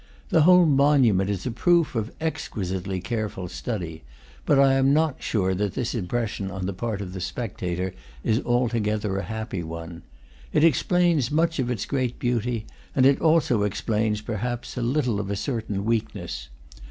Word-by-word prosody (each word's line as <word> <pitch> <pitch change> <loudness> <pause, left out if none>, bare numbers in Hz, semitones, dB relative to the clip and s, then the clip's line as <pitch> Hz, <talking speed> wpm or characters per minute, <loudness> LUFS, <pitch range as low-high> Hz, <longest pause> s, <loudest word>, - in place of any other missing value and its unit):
The - - +4
whole 180 +2 +7
monu 140 -5 +4
ment 95 +1 +1
is 100 -3 -2
a 125 - -1
proof 170 +6 +2
of 115 -1 -2
exquisitely 95 - -3
careful 100 -2 -3
study; 85 - -5 0.4
but 145 - +5
I 135 -1 +6
am 135 +1 +4
not 155 -3 +1
sure 95 -4 0
that 100 +1 -2
this 125 -3 -2
impression 105 -2 -2
on 95 -1 -4
the 100 - -2
part 105 +1 -3
of 90 -2 -6
the 95 - -5
spec 115 +3 -4
tator 90 +1 -2 0.3
is 110 +1 +2
altogether 110 -5 0
a - - -1
happy 110 -4 -4
one. 85 +1 -7 0.5
It - - +3
explains 165 -2 +3
much 165 +1 +1
of 125 -2 0
its 115 -6 -2
great 130 -4 -1
beauty, 120 -2 -1 0.3
and 130 - +4
it 140 0 +4
also 155 -9 +3
explains, 105 +1 0
perhaps, 120 +2 -4
a 125 - -3
little 125 -3 +1
of 100 -1 -4
a 100 - -1
certain 105 -3 -3
weakness. 110 - -2
115 Hz, 175 wpm, -25 LUFS, 95-130 Hz, 0.5 s, whole